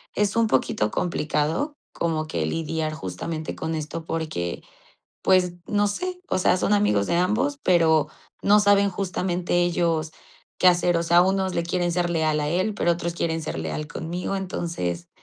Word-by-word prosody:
es 210 +1 +1
un 230 -1 +3
poquito 110 - +1
complicado 160 - -1 0.2
como 160 -2 -1
que - - -2
lidiar 160 -1 -2
justamente 155 - -5
con 160 0 -3
esto 155 +1 -5
porque, 155 - -3 0.6
pues, 185 -2 +3
no 205 0 +2
sé, 360 - -3
o - - +1
sea, 185 - +3
son 205 - +1
amigos 105 - +2
de 170 - +1
ambos, 240 +11 +1
pero, 165 -4 +4 0.3
no 205 +1 +5
saben 200 -1 +4
justamente 180 -2 -1
ellos 170 -2 0 0.5
qué 185 - +4
hacer. 175 -1 +4
O 170 - 0
sea, 170 +1 +5
unos 190 0 +1
le - - +1
quieren 175 0 0
ser 175 0 0
leal 155 -2 +1
a 150 - -1
él, 185 +5 0
pero 175 - +1
otros 170 0 -3
quieren 165 -1 -1
ser 150 - -4
leal 80 - -3
conmigo. 175 +5 -4
Entonces, 165 - -3
170 Hz, 170 wpm, -24 LUFS, 160-190 Hz, 0.6 s, no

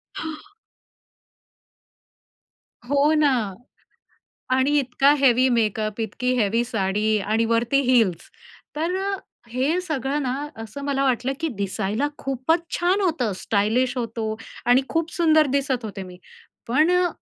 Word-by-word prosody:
हां. 320 +4 -6 2.4
हो 285 +2 +3
ना 300 -2 +4 1.3
आणि 285 +3 +3
इतका 270 +2 +3
हेवी 260 -1 +4
मेकअप, 215 -2 0
इतकी 235 +3 -1
हेवी 230 +2 +2
साडी 215 -1 0
आणि 215 +3 0
वरती 230 +4 +2
हील्स. 210 -9 +2 0.5
तर 330 +4 -1
अ, 395 0 -1 0.4
हे 270 +9 0
सगळं 295 -4 -2
ना 255 -2 -1 0.3
असं 250 +6 -8
मला 275 -1 0
वाटलं 255 0 +1
की 325 - 0
दिसायला 205 +6 -1
खूपच 270 +5 0 0.2
छान 365 +3 +2
होतं, 315 - 0
स्टायलिश 225 +7 0
होतो 225 -2 -3 0.3
आणि 245 +2 +5
खूप 330 0 -1
सुंदर 315 -3 +4
दिसत 265 -4 -1
होते 200 -2 -6
मी, 180 -1 -11 0.5
पण 305 +8 +3
अ, 360 0 +3
255 Hz, 125 wpm, -23 LUFS, 220-295 Hz, 2.4 s, आणि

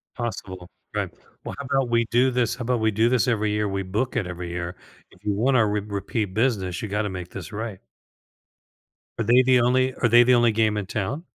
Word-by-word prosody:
Possible, 95 -7 -5 0.3
right. - - -1 0.3
Well - - -6
how 140 - -5
'bout 135 -3 +1
we 115 0 +2
do 125 +2 +3
this 120 -2 0
how 125 - -6
'bout 125 0 0
we 110 0 +2
do 110 +3 +2
this 125 -1 +2
every 110 -3 +1
year, 105 0 0
we 95 0 -2
book 110 +8 -2
it 95 - 0
every 90 -1 -6
year. 85 +1 -4 0.4
If 95 - -22
you 105 -1 0
wanna 120 +2 +3
re 105 0 0
repeat 100 0 -3
business 100 -7 0
you 110 - -4
gotta 105 +1 -1
make 90 -1 -6
this 95 +2 -8
right. 110 -2 -5 1.4
Are - - +1
they 120 +4 +5
the 130 -1 +4
only 130 +1 +2
are 120 - +1
they 120 +2 +7
the 125 0 +5
only 120 -1 +4
game 110 -1 +1
in 100 - -2
town? 130 - -3
110 Hz, 220 wpm, -24 LUFS, 100-120 Hz, 1.4 s, they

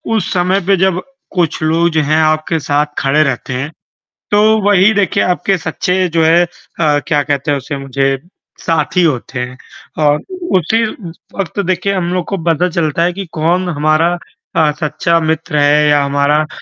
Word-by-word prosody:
उस 215 - -1
समय 185 +2 +1
पे 195 -1 +4
जब 185 0 +1 0.3
कुछ 170 -4 0
लोग 165 +2 +2
जो 160 -1 +1
हैं 155 +2 +1
आपके 155 +1 +1
साथ 145 0 +1
खड़े 145 +3 +3
रहते 130 -2 -3
हैं, 135 +4 -3 0.6
तो 205 0 +4 0.2
वही 205 +1 +4
देखिए 200 -2 +1
आपके 185 +2 0
सच्चे 180 +3 -1
जो 165 0 +1
है 170 +2 +5
अ, 155 -3 -2
क्या 150 -4 +2
कहते 140 0 -1
हैं 145 - +1
उसे 140 +1 -5
मुझे 135 0 -1 0.4
साथी 165 +2 0
होते 130 -4 -1
हैं 125 +1 -5 0.5
और 145 0 +3 0.4
उसी 220 +7 +1 0.5
वक़्त 195 0 -4
देखिए 185 +2 0
हम 185 -2 -1
लोग 180 -2 -1
को 195 - -2
पता 170 +2 +1
चलता 165 -2 0
है 175 - +2
कि 195 +2 -6
कौन 175 +4 0
हमारा 155 +3 +1 0.4
ता 160 -2 +3
सच्चा 165 +2 +1
मित्र 160 0 -1
है 150 +1 +4
या 145 -1 +4
हमारा 140 +1 +2
अ, 155 - -3
160 Hz, 175 wpm, -15 LUFS, 145-180 Hz, 0.6 s, है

